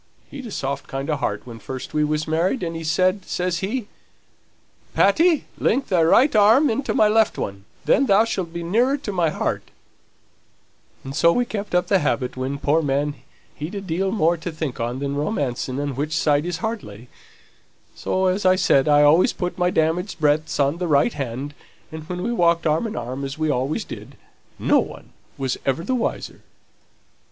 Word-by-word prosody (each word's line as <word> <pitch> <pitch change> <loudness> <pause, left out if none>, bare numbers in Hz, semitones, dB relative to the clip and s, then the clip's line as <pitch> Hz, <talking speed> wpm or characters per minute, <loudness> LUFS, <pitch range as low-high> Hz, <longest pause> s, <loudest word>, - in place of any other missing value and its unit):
He'd 265 -4 -7
a - - -8
soft 140 -4 -4
kind 135 +3 -3
of 150 - -1
heart 105 -6 -2
when 115 -2 -9
first 130 +3 -7
we 150 - +2
was 150 0 -1
married, 170 +10 0
and 165 -1 -3
he 165 - -5
said, 185 +4 +1
says 180 -1 -2
he, 215 +5 -2 1.1
'Patty, 320 - +3
link 265 +4 +1
thy 180 -4 +3
right 230 - +4
arm 225 +7 +5
into 265 +5 -2
my 215 - +5
left 220 +1 +2
one, 100 0 -5 0.2
then 275 - +3
thou'lt 195 -4 +2
be 170 0 -5
nearer 240 +11 +2
to 265 -7 -5
my 175 -4 +1
heart;' - - -3 1.3
and 135 +1 -7
so 170 - +5
we 245 +6 +1
kept 210 -5 -4
up 180 - +3
the 195 - +3
habit, 135 -4 -1
when, 130 +2 -3
poor 145 +3 +2
man, 145 0 0 0.4
he'd 155 +7 -6
a - - -2
deal 190 +1 -1
more 175 -5 +2
to 170 +2 -5
think 155 -5 -5
on 120 +2 -2
than 140 +1 -3
romancing 140 - -2
on 145 -2 -3
which 150 +4 -2
side 145 +1 +2
his 175 -1 -2
heart 220 -1 -2
lay; 105 +4 -12 0.9
so, 190 0 -1
as 185 +2 +1
I 185 0 +5
said, 140 -7 +3
I 145 0 +5
always 155 +5 +5
put 180 0 -4
my 180 0 +3
damaged 170 +3 0
breadths 155 +1 +1
on 140 +4 +1
the 180 - -1
right 150 +9 +3
hand, 135 +2 -5 0.4
and 155 +1 -9
when 180 0 -4
we 235 - -1
walked 170 -5 +2
arm 160 +8 +1
in 215 - -6
arm, 125 +3 -5
as 135 +1 -5
we 155 -1 0
always 135 +3 -1
did, - - -10 0.4
no - - +3
one - - -7 0.3
was 135 -1 -2
never 135 +4 -1
the 260 - -1
wiser." 245 -3 -3
165 Hz, 195 wpm, -22 LUFS, 140-195 Hz, 1.3 s, arm